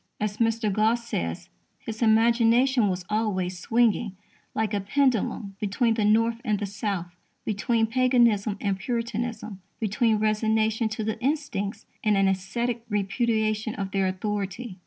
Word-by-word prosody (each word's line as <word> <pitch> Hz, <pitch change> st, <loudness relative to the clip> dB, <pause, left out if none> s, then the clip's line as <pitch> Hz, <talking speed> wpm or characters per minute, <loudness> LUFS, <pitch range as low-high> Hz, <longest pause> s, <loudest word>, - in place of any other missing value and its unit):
As 210 Hz, 0 st, -2 dB
Mr. 225 Hz, -2 st, +1 dB
Gosse 225 Hz, +3 st, +2 dB
says, 85 Hz, -, -4 dB, 0.3 s
"his 220 Hz, 0 st, -8 dB
imagination 235 Hz, +2 st, +4 dB
was 180 Hz, -1 st, -3 dB
always 190 Hz, -5 st, -1 dB
swinging, 225 Hz, -1 st, +1 dB, 0.4 s
like 220 Hz, -1 st, 0 dB
a 205 Hz, -, 0 dB
pendulum, 220 Hz, -3 st, 0 dB
between 220 Hz, +3 st, +1 dB
the 220 Hz, -1 st, 0 dB
North 230 Hz, +2 st, +2 dB
and 215 Hz, -4 st, +1 dB
the 205 Hz, -, -2 dB
South, 195 Hz, -3 st, -4 dB, 0.3 s
between 225 Hz, +2 st, +1 dB
Paganism 235 Hz, -4 st, +2 dB
and 200 Hz, -2 st, -1 dB
Puritanism, 230 Hz, -2 st, -3 dB, 0.2 s
between 220 Hz, +1 st, +1 dB
resignation 220 Hz, +1 st, +1 dB
to 215 Hz, 0 st, -4 dB
the 220 Hz, 0 st, -3 dB
insticts 250 Hz, -8 st, -2 dB, 0.2 s
and 210 Hz, -2 st, +3 dB
an 195 Hz, 0 st, +3 dB
ascetic 225 Hz, +5 st, -1 dB
repudiation 215 Hz, +1 st, 0 dB
of 195 Hz, -1 st, -4 dB
their 195 Hz, -1 st, +1 dB
authority." 195 Hz, +2 st, -4 dB
215 Hz, 135 wpm, -26 LUFS, 200-230 Hz, 0.4 s, imagination